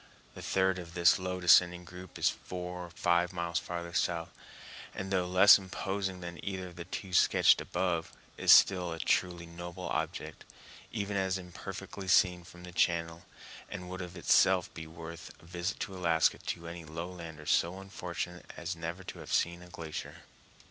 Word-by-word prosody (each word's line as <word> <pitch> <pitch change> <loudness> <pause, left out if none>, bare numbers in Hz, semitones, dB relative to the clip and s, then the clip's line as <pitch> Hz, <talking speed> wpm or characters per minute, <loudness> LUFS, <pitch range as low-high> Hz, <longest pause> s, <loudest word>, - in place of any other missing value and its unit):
The - - -9
third 95 -1 +1
of 85 -1 -10
this 85 0 +5
low 90 0 -3
descending 90 0 +5
group 90 +1 -10
is - - +2
four 90 0 -4
or - - -15
five 85 +1 +1
miles 85 -1 -1
farther 85 0 -6
south, 85 -2 0 0.6
and, 95 0 -5
though 90 -2 +1
less 95 +3 +8
imposing 95 0 -3
than 85 -1 -7
either 95 -2 -4
of 90 - -15
the 85 0 -7
two 95 -2 -6
sketched - - +5
above, 85 -3 -1 0.2
is - - +4
still 90 -3 +6
a - - -6
truly 85 +1 0
noble 85 +2 -7
object, - - -3 0.5
even 100 -2 -2
as 95 -1 +1
imperfectly 95 +2 -8
seen 90 -1 +4
from 90 0 -14
the 90 - -9
channel, 85 0 0 0.4
and 90 0 -7
would 95 0 -5
of 90 0 -7
itself 90 +1 +4
be 80 -1 -7
well 80 +1 -15
worth 85 0 -9
a - - -18
visit 85 +3 -3
to 95 - -4
Alaska 85 -3 +2
to 85 - -5
any 85 0 -7
lowlander 85 -1 -7
so 85 +4 +2
unfortunate 90 -2 -6
as - - -4
never 85 +3 -5
to - - -8
have - - -9
seen 85 0 +1
a 90 - -13
glacier. 80 -3 -7
90 Hz, 175 wpm, -31 LUFS, 85-95 Hz, 0.6 s, less